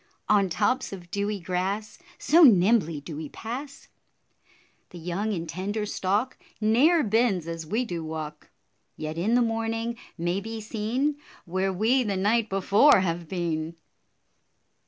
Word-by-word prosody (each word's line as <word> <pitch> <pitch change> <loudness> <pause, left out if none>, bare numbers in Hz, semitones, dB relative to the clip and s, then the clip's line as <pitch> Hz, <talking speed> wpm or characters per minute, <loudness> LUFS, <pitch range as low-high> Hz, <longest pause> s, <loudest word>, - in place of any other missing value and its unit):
On 200 -2 +3
tops 255 +9 0
of 175 -3 -10
dewy 205 0 -2
grass 190 - -3 0.2
So 325 +5 +4
nimbly 195 - +5
do 150 +1 -8
we 150 -1 -6
pass, 265 +5 -7 1.0
The 180 - -11
young 180 +6 -2
and 170 -4 -3
tender 205 +5 -3
stalk 205 +5 -1 0.2
Ne'er 265 +10 +4
bends 215 -5 +1
as 165 -1 -5
we 225 +8 0
do 175 -6 -4
walk; 155 -1 -6 0.5
Yet 155 +1 -4
in 215 +7 +2
the 245 - +4
morning 225 +1 -2 0.2
may 175 +3 -1
be 225 +2 -6
seen 230 +7 -1 0.3
Where 185 +2 -1
we 225 +8 +2
the 205 -5 -1
night 215 +3 +1
before 200 +6 +5
have 170 -2 -2
been. 165 -2 -3
200 Hz, 140 wpm, -26 LUFS, 175-225 Hz, 1.0 s, nimbly